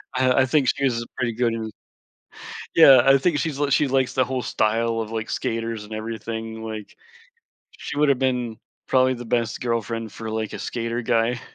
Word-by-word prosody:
I 130 0 +3
I - - +4
think 140 -1 +2
she 140 - -1
was, 120 -3 0
uh, - - -6
pretty 120 -2 -1
good 115 0 0
in 110 -1 -4 1.1
Yeah, 135 -6 +8
I 135 0 +6
think 150 +1 +1
she's 155 -4 -2
l 145 -1 +1
she 145 - +3
likes 130 -1 +1
the 130 - +3
whole 130 0 -3
style 115 +1 0
of, 110 -1 -5
like, 110 0 -4
skaters 115 -1 -3
and 105 - -12
everything, 110 0 -5
like, 110 -2 -7 0.8
she 150 - -7
woulda 145 -2 +4
been 125 -4 -1 0.3
probably 130 0 +3
the 120 0 -8
best 115 -1 -1
girlfriend 115 -2 -2
for, 110 -1 -6
like, 110 -1 -3
a - - -6
skater 115 0 -3
guy. 115 +1 +1
115 Hz, 190 wpm, -23 LUFS, 115-130 Hz, 1.1 s, Yeah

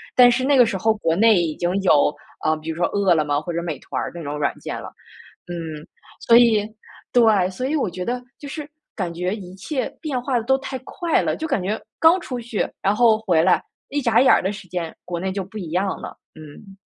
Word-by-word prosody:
但 250 -1 +8
是 255 +2 0
那 280 +1 +3
个 245 - +7
时 210 -4 -2
候 220 +4 +2
国 165 -6 0
内 215 -2 +5
已 160 -3 -2
经 175 0 -1
有， 150 -5 +4 0.3
呃， 155 - +3
比 155 +1 -8
如 160 - -3
说 170 - +1
饿 200 -3 +2
了 155 - +2
么 145 0 0
或 170 +2 -5
者 170 - -1
美 165 -4 -4
团 - - -4
儿 - - -4
那 170 - -7
种 145 0 -4
软 145 - 0
件 - - -5
了。 - - -8 0.6
嗯， 160 -3 -6 0.4
所 235 0 +6
以， 230 -4 +5 0.5
对， 215 -6 +4
所 220 +8 -4
以 300 - -1
我 270 -10 0
觉 180 +1 -5
得 245 +1 -2 0.2
就 290 - -8
是 295 +1 -7 0.3
感 180 -5 -3
觉 180 +4 -2
一 185 -4 -10
切 260 +9 -3
变 275 -6 -2
化 250 -1 0
得 225 - -1
都 265 +2 +3
太 270 -1 -5
快 345 -4 0
了。 - - -1
就 320 - -4
感 270 -9 0
觉 200 +4 -2 0.2
刚 330 +3 +6
出 250 -6 -5
去， 230 -2 -2
然 200 +2 +2
后 225 -1 +5
回 175 -7 +2
来， - - +4 0.3
一 290 - -1
眨 245 -1 +4
眼 265 - +6
儿 - - +4
的 190 - -1
时 195 -2 -10
间， 170 -2 -4
国 175 -1 -4
内 190 +2 -2
就 195 -1 -2
不 195 +4 -11
一 175 -6 -6
样 190 +2 -1
了， - - -8 0.2
嗯。 160 +6 -13
195 Hz, 265 characters per minute, -22 LUFS, 175-245 Hz, 0.6 s, 但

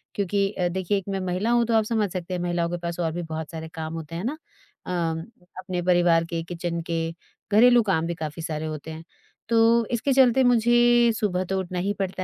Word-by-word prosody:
क्योंकि 200 0 0
अ, 180 -3 -1
देखिए 190 +2 -1
एक 195 - -5
मैं 195 - -2
महिला 185 +6 -1
हूँ, 240 -1 +3
तो 230 - -1
आप 220 - +4
समझ 215 -3 0
सकते 185 0 -4
हैं 175 - -3
महिलाओं 175 -1 -1
के 175 - -3
पास 170 0 -5
और 165 - 0
भी 175 - -3
बहुत 160 0 -6
सारे 160 0 -6
काम 160 0 -5
होते 165 0 -7
हैं 175 - -4
ना। 295 +6 -2 0.5
अम, 170 -3 -1 0.4
अपने 185 -1 -3
परिवार 175 -2 +4
के, 165 0 -3
किचन 170 0 -4
के, 165 0 -2 0.4
घरेलू 240 +2 +7
काम 165 -5 0
भी 170 - -2
काफ़ी 155 0 -6
सारे 155 -1 -3
होते 155 0 -6
हैं। 160 +1 -8 0.5
तो 230 0 +4
इसके 245 +3 +1
चलते 260 0 +5
मुझे 240 0 +4
सुबह 185 -3 0
तो 190 +1 -1
उठना 180 -1 -4
ही 200 +3 -1
पड़ता 190 -1 -2
180 Hz, 220 wpm, -24 LUFS, 165-220 Hz, 0.5 s, घरेलू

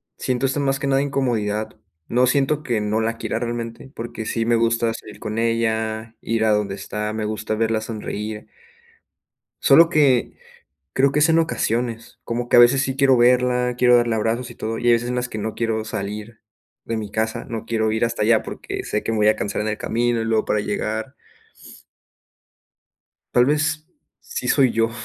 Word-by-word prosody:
siento 130 +1 -1
esto 135 +2 0
más 135 -1 0
que 140 - -2
nada 135 0 +3
incomodidad. 115 -7 -1 0.3
No 125 +2 +3
siento 140 +3 +1
que 120 -6 0
no 105 +1 0
la 115 +1 -1
quiera - - -3
realmente 120 +2 -5
porque 115 -1 -6
sí 115 +1 -1
me 120 0 +3
gusta 115 0 +1
salir 105 -1 -10
con 110 0 -5
ella, 110 -1 -1
ir 115 -1 0
a 110 - +3
donde 105 -2 0
está, 105 +1 -4
me 110 0 -3
gusta 110 0 -3
verla 110 0 0
sonreír. 110 -1 -5 1.1
Solo 165 0 +6
que 140 -6 +3 0.6
creo 135 +1 +3
que 150 - +1
es 155 +2 +4
en 165 - +4
ocasiones, 120 -7 -2
como 120 +1 -3
que - - +5
a - - +9
veces 130 +3 +6
sí 130 - -2
quiero 135 -1 +4
verla, 125 0 +3
quiero 125 0 +5
darle 120 -1 +2
abrazos 115 +3 -1
y - - -10
todo, 115 0 -4
y - - -7
hay 120 - +6
veces 120 +1 +1
en 125 - -2
las 125 0 -2
que 110 - -5
no 110 +1 -3
quiero 115 -1 -1
salir 105 +1 -6 0.4
de 115 - -3
mi 105 -2 -5
casa. 110 +2 -2
No 115 -2 -5
quiero 110 -1 0
ir 110 +2 +1
hasta 115 -1 -3
allá 110 +1 +4
porque - - -6
sé 105 - -2
que - - -2
me 110 - -1
voy 105 0 +4
a 110 - +3
cansar 100 +1 -2
en 110 - -2
el 105 - -2
camino 120 0 0
y - - -2
luego 110 -1 +1
para 105 - 0
llegar. 110 +5 -3 2.2
Tal 120 - +5
vez 150 +1 0 0.4
sí 470 0 -5
soy 135 -4 +4
yo. 115 0 +1
115 Hz, 200 wpm, -22 LUFS, 110-125 Hz, 2.2 s, a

